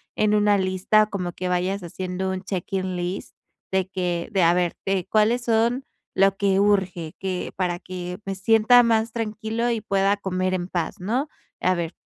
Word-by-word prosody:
en 210 0 +2
una 210 -1 +4
lista 190 +3 +3
como 180 -4 -4
que 185 - -4
vayas 180 +2 0
haciendo 185 +2 -3
un 185 - -3
check 190 -3 -4
in 185 -1 -1
list 180 +2 -4 0.4
de 190 -1 +1
que, 180 -2 -2
de 190 -4 +2
a 170 - +5
ver, 175 -1 0
de 195 -2 0
cuáles 225 +3 +3
son 235 +3 +2 0.3
lo 195 0 +4
que 195 -1 +2
urge, 185 -5 +1
que 185 -2 -3
para 180 -2 0
que 180 0 -6
me 195 0 -3
sienta 225 +5 +5
más 225 -1 +2
tranquilo 225 +1 -2
y 230 -2 -1
pueda 195 +1 +2
comer 185 -1 -1
en 175 0 -3
paz, 175 -3 -2
¿no? 240 +10 -1 0.3
A 185 +1 +2
ver, 170 -1 -3
190 Hz, 185 wpm, -24 LUFS, 180-215 Hz, 0.4 s, a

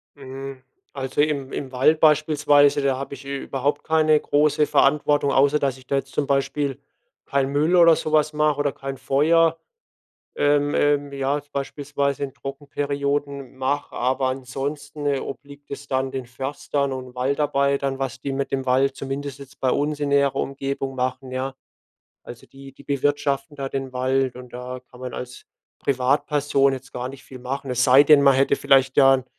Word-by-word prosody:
Hm, 135 -1 -8 0.3
also 135 0 -1
im 145 -3 -1
im 135 -2 -5
Wald 145 +5 +3
beispielsweise, 145 -2 +4
da 135 -2 +1
habe 140 +1 -6
ich 140 0 -10
überhaupt 140 +1 -2
keine 155 -1 +3
große 150 +1 +2
Verantwortung, 145 0 +2
außer 140 +3 +3
dass 135 -2 -1
ich 130 - -17
da 140 - 0
jetzt 135 0 -4
zum 145 - 0
Beispiel 140 0 -1 0.5
kein 135 -1 0
Müll 155 +5 +2
oder 170 -2 +7
so 155 - -4
was 155 0 +2
mache 150 -1 +1
oder 145 -1 +1
kein 135 0 -7
Feuer, 160 +5 +2 0.8
ähm, 145 0 +2
ähm, 145 -1 +1
ja, 140 +1 0
jetzt 145 0 -11
beispielsweise 140 0 -2
in 135 - -5
Trockenperioden 140 0 -3
mache, 140 +2 -2
aber 130 +2 0
ansonsten, 140 +3 -5
äh, 140 -1 +1
obliegt 140 +1 -9
es 140 0 -7
dann 130 0 -1
den 130 -2 -5
Förstern 135 +3 -3
und 130 -1 -8
Waldarbeitern, 140 +1 0
was 130 -1 -3
die 140 - -3
mit 135 0 -3
dem 135 -1 -2
Wald, 135 +1 +2
zumindest 140 +1 -5
jetzt 140 0 -13
bei 130 - +2
uns 145 +2 -1
in 145 - -1
näherer 140 -1 +2
Umgebung, 135 0 -3
machen, 130 0 -3
ja. 130 +1 -3 0.7
Also 120 - -11
die 135 0 -13
die 135 - -17
bewirtschaften 140 0 -1
da 135 -1 -4
den 135 -1 -4
Wald 130 0 0
und 125 -1 -11
da 125 +1 -6
kann 125 - -15
man 125 -1 -6
als 125 0 -8 0.3
Privatperson 140 +1 +1
jetzt 130 -1 -7
gar 125 +1 -4
nicht 135 -1 -12
viel 130 - -11
machen. 135 +2 -5
Es 125 0 +2
sei 130 +1 +7
denn, 145 -1 +6
man 140 -1 +6
hätte 135 +1 +3
vielleicht, 135 -1 +3
ja 135 -1 +7
'n 130 - -7
140 Hz, 180 wpm, -23 LUFS, 135-145 Hz, 0.8 s, oder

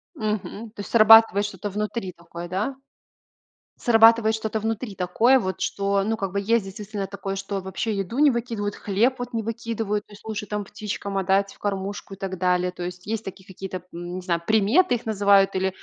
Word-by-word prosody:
Мгм. 215 +1 -4
То 210 - -19
есть, - - -9
срабатывает 225 -2 +7
что-то 205 0 -5
внутри 210 -1 -3
такое, 170 0 -9
да? 200 +9 -2 1.0
Срабатывает 225 -1 +5
что-то 220 0 -2
внутри 220 0 -3
такое, 220 +9 +3
вот, 190 -6 -3
что, 200 0 0
ну 220 +3 -1
как 195 -4 -3
бы, 200 - 0
есть, 225 +1 +2
действительно 200 +1 -5
такое, 195 0 -5
что 195 0 -3
вообще 190 +4 -3
еду 200 +6 -3
не 295 -1 +7
выкидывают, 230 -4 -2
хлеб, 225 +6 +1
вот, 245 -1 -6
не 225 - 0
выкидывают, 225 -2 -3
то - - -19
есть, 205 - -16
лучше, 215 -1 -4
там, 210 0 -3
птичкам 200 -1 -5
отдать, 195 +1 +1
в - - -20
кормушку, 200 0 -4
и - - -14
так 190 -1 -5
далее. 180 0 +1
То 180 - -8
есть, 180 +1 -7
есть 220 0 -2
такие 190 0 -9
какие-то 190 0 -7
м, 180 - -7
н 175 +1 -6
не - - -4
знаю, 170 -2 -1
приметы 220 - +4
их 240 - -4
называют 200 -2 +4
или, 190 0 +1
205 Hz, 200 wpm, -24 LUFS, 190-220 Hz, 1.0 s, срабатывает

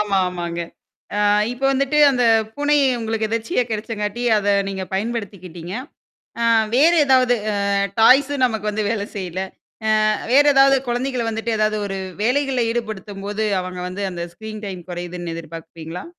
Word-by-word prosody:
ஆமா 205 -2 0
ஆமாங்க. 170 -1 -4 0.6
ஆ - - 0 0.3
இப்போ 260 +2 -6
வந்துட்டு 275 +2 +1
அந்த 250 -2 0 0.3
பூனை 290 +1 +2 0.2
உங்களுக்கு 225 -1 -1
எதர்ச்சியா 230 +5 0
கிடைச்சாங்காட்டி 215 +1 -3 0.2
அத 205 0 -2 0.2
நீங்க 190 -1 -4
பயன்படுத்திக்கிடீங்க. 190 -5 -5 0.7
ஆ - - +1 0.3
வேறு 325 +6 +5
ஏதாவது 255 -2 +4 0.2
அ - - -1 0.5
டாய்ஸ்ம் 270 +3 +5
நமக்கு 220 -3 -2
வந்து 210 0 -2
வேல 215 -3 -1
செய்ல. 185 -1 -4 0.5
ஆ - - +2 0.4
வேற 280 +3 +7
ஏதாவது 270 0 +6
குழந்தைகள 245 0 -1
வந்துட்டு 225 +1 -3
ஏதாவது 215 0 +1
ஒரு 195 -1 -4 0.3
வேலைகள்ல 260 0 +1
ஈடுபடுத்தும்போது 210 -2 -4 0.2
அவங்க 180 0 -7
வந்து 200 +2 -5
அந்த 170 -1 -5
ஸ்கிரீன் 215 +1 -8
டைம் 185 -2 -7
குறையிதுன் 175 -1 -5
எதிர்பார்ப்பீங்களா? 165 +1 -8
215 Hz, 140 wpm, -21 LUFS, 185-245 Hz, 0.7 s, வேற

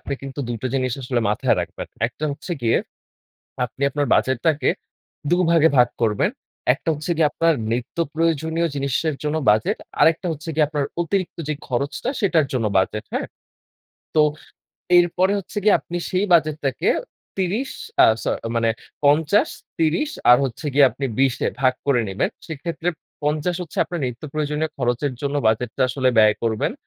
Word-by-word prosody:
আপনি - - -6
কিন্তু 135 +1 -6
দুটো 120 +1 -3
জিনিস 130 -2 0
আসলে 125 -1 0
মাথায় 105 - +2
রাখবেন। - - -6 0.2
একটা 125 +6 -6
হচ্ছে 145 +5 -5
গিয়ে, 115 - +3 0.9
আপনি 125 +3 -8
আপনার 145 -1 -1
বাজেটটাকে 140 +4 +1 0.6
দু'ভাগে 170 -2 +4
ভাগ 125 -1 +6
করবেন। 105 -3 +2 0.4
একটা - - -9
হচ্ছে 150 +3 -5
গিয়ে 155 -2 +4
আপনার 165 +1 +2 0.2
নিত্যপ্রয়োজনীয় 160 +5 -1
জিনিসের 140 +3 -1
জন্য 150 +1 -1
বাজেট, 110 +1 +2 0.2
আরেকটা 165 +3 +4
হচ্ছে 155 +2 -8
গিয়ে 155 0 +3
আপনার 150 -2 -1 0.2
অতিরিক্ত 185 +2 -2
যে 155 - 0
খরচটা 140 - -2
সেটার 170 -8 +3
জন্য 120 -4 0
বাজেট, 105 +3 -1
হ্যাঁ? - - -1 0.9
তো, 155 - +7 0.8
এরপরে 175 +2 +3
হচ্ছে 200 +2 -10
গিয়ে 210 - +6
আপনি 175 - -6
সেই 185 +2 +1
বাজেটটাকে 155 -4 +2 0.5
৩০ 200 +8 -1 0.3
আ - - +8 0.2
স - - -7 0.3
মানে 115 -1 +2 0.3
৫০, 155 +7 +4 0.3
৩০ 165 - +1 0.2
আর 125 - +9
হচ্ছে 135 +4 -5
গিয়ে 140 -1 +7
আপনি 130 +4 -6
২০ 135 -2 +3
এ - - +2
ভাগ 130 -1 +3
করে 135 -4 +3
নেবেন। 95 +1 0 0.2
সেক্ষেত্রে 165 +2 -4 0.4
৫০ 155 +4 0
হচ্ছে 165 - -8
আপনার 175 0 -5
নিত্যপ্রয়োজনীয় 150 +4 -3
খরচের 125 +2 0
জন্য 140 0 -1
বাজেটটা 110 +3 +1
আসলে 130 +1 +1
ব্যয় 110 -1 +6
করবেন। 110 -2 0
150 Hz, 150 wpm, -22 LUFS, 125-165 Hz, 0.9 s, আর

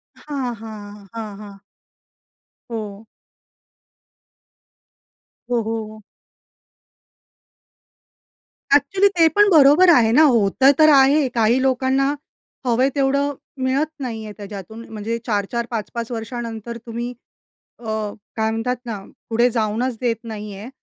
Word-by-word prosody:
हां, 275 -5 -4
हां, 205 -2 -10
हां, 215 -3 -6
हां. 200 -2 -11 1.1
हो. 215 -1 -6 2.5
हो, 240 -1 +2
हो. 220 -1 -5 2.7
एक्चुअली 375 +8 +3
ते 330 -1 +6
पण 415 0 +6
बरोबर 310 +2 +6
आहे 235 -9 +5
ना, 305 +6 +6
होतं 255 +1 +4
तर 310 0 +7
आहे. 275 +1 +5
काही 235 +1 +2
लोकांना 265 +1 +1 0.6
हवं 240 0 +1
आहे 265 - +4
तेवढं 280 +1 +1 0.3
मिळत 270 +4 +1
नाही 230 -4 -5
आहे 210 - -8
त्याच्यातून. 205 +2 -9
म्हणजे 225 +1 -4
4-4, 225 +2 -1
5-5 230 +1 -4
वर्षानंतर 230 0 -5
तुम्ही 235 +1 -5 0.7
अ, 240 - -16 0.5
काय 220 0 +1
म्हणतात? 225 +3 -1
ना 220 -3 -4 0.3
पुढे 235 +2 +3
जाऊनच 230 +2 -1
देत 240 -2 0
नाही 210 -2 -7
आहे. 210 +5 -8
235 Hz, 110 wpm, -21 LUFS, 220-265 Hz, 2.7 s, तर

